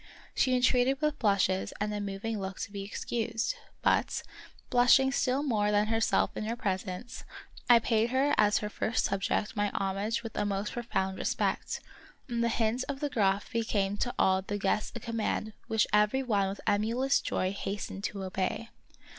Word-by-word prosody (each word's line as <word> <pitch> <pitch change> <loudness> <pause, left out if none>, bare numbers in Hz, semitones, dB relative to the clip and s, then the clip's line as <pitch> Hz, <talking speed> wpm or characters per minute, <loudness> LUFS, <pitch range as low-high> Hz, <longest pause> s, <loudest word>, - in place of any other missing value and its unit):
She 255 -1 +2
en 250 - +1
treated 255 +1 +3
with 300 -1 0
blushes 195 -3 +1
and 210 0 -1
a 205 - -2
moving 205 +2 -3
look 190 0 -5
to - - -5
be 200 -1 -5
excused; 225 - -2 0.3
but, - - +2 0.5
blushing 255 +2 +5
still 270 +1 +1
more 215 -7 +1
than 210 +1 +2
herself 225 0 +1
in 215 - -3
her 230 +2 -2
presence, 195 +1 -4 0.5
I 240 - +9
paid 225 0 +2
her 265 +3 +2
as 210 0 +4
her - - -1
first 220 +3 0
subject 195 +1 -1
my 205 -1 +1
homage 200 +4 -1
with 225 - -7
a - - 0
most 205 0 -2
profound 190 -5 -2
respect, - - -1 0.5
and 235 -2 -1
the 235 - +2
hint 225 +2 0
of 275 -1 -3
the 290 - -1
Graf 200 -5 +1
became 210 -4 0
to 245 - -1
all 190 0 +3
the 205 +2 -4
guests 200 +1 0
a - - -4
com 230 +1 -5
mand 215 0 -1
which 220 -2 +2
every 210 +6 +3
one 200 -6 +1
with 195 - -6
emulous 230 +6 +2
joy 185 0 -1
hastened 200 0 -5
to 200 -2 -4
obey. 190 +4 -2
215 Hz, 180 wpm, -30 LUFS, 200-240 Hz, 0.5 s, I